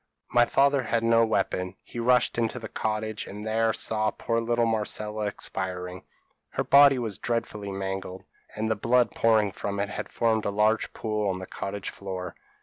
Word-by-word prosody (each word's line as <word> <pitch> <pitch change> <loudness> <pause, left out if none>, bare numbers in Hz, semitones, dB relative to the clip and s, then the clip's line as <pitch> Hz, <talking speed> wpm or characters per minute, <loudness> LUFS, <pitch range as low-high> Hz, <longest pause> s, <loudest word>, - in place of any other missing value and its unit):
My 120 +2 +5
father 140 0 +3
had 115 -1 0
no 115 0 +5
weapon; 95 -4 -1
he 120 - -8
rushed 125 0 +3
into 115 +1 0
the 110 -2 -6
cottage, 110 0 -3
and 105 +2 -7
there 110 +1 +2
saw 110 0 +1
poor 115 +2 -1
little 120 0 +1
Marcella 105 -1 -1
expiring. 90 -2 -5 0.5
Her - - 0
body 140 -1 +7
was 110 -6 -3
dreadfully 110 -4 -3
mangled, 95 -1 -4 0.3
and 110 +1 -1
the - - +2
blood 120 +3 +2
pouring 110 -3 +3
from 100 +1 -4
it 100 0 -1
had - - -5
formed 110 -2 +1
a - - +1
large 105 +2 +1
pool 105 -2 -1
on 95 - -1
the 95 - -6
cottage 100 +1 -5
floor. 95 -2 -6
110 Hz, 175 wpm, -27 LUFS, 100-115 Hz, 0.5 s, body